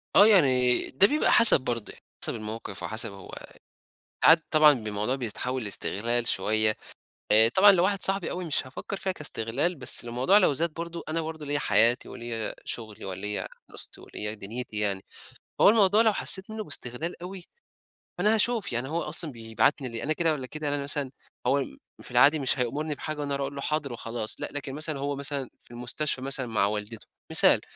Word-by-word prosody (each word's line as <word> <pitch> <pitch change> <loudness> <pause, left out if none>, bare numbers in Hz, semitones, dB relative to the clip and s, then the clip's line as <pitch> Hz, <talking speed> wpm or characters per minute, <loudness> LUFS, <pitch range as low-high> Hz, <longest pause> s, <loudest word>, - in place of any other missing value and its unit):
آه، 200 - +8
يعني 130 - +4
ده 195 +10 +5
بيبقى 300 +1 +1
حسب 230 - +6
برضو، 120 -4 -4 0.3
حسب - - -1
الموقف 110 +1 -5
وحسب 110 0 -4
هو 95 -2 -12 0.9
ساعات 165 0 +7
طبعًا 155 -1 +6
ب 115 -5 -5
الموضوع 105 +5 0
بيتحول 125 0 -4
لاسْتغلال 115 +4 -1
شوية 110 +2 +1 0.6
آآ، 110 +1 +6
طبعًا 195 - +6
لو 180 -1 +2
واحد 195 0 0
صاحبي 195 -2 0
أوي 180 0 -4
مش 150 -5 -1
هافكر 135 +9 -7
فيها 190 -1 -3
كاسْتغلال، 145 +1 -2
بس 130 -3 +5
الموضوع 125 - +3
لو 180 - +3
زاد 165 +4 0
برضو 170 0 -6
أنا 165 +1 -1
برضو 160 -1 -7
ليّا 145 0 -1
حياتي 120 -2 +3
وليّا 115 -2 -4
شغلي 110 -3 -7
وليّا 100 +2 -4 0.2
دراستي - - -9
وليّا 105 +1 -5
دنْيتي 110 +2 -6
يعني، 100 -2 -1 0.6
هو - - +7
الموضوع 210 0 +4
لو 220 - +3
حسيت 190 0 -1
منه 220 0 -5
باسْتغلال 150 +3 -2
أوي، 185 0 -8 0.7
فأنا 210 +5 +2
هاشوف 225 -1 0
يعني 120 +3 -3
هو 165 +2 -2
أصلًا 160 -4 +3
بيبعتني 115 +4 -1
ليه، 115 0 -6
أنا 155 - 0
كده 165 0 +1
والّا 135 -4 -5
كده، 155 +2 -5
أنا 145 0 -1
مثلًا 140 -1 -2 0.4
هو 140 +3 +2
م 95 - -7 0.3
في - - -8
العادي 140 +6 +5
مش 135 -1 +1
هيأمُرني 150 +5 -2
بحاجة 155 +1 -6
وأنا 140 -1 -3
ارُ‌وحْ 140 - -2
اقول 140 - -9
له 140 - -6
حاضر 150 -4 -2
وخلاص 115 -1 -5
لأ، - - -3
لكن 145 -2 -5
مثلًا 155 -2 -4
هو 140 +1 -3
مثلًا 140 -2 -5
في - - -17
المستشفى 125 +4 -3
مثلًا 135 0 -2
مع 110 -3 +1
والدته، 105 +2 -5 0.2
مثال، - - +5
135 Hz, 190 wpm, -26 LUFS, 115-160 Hz, 0.9 s, آه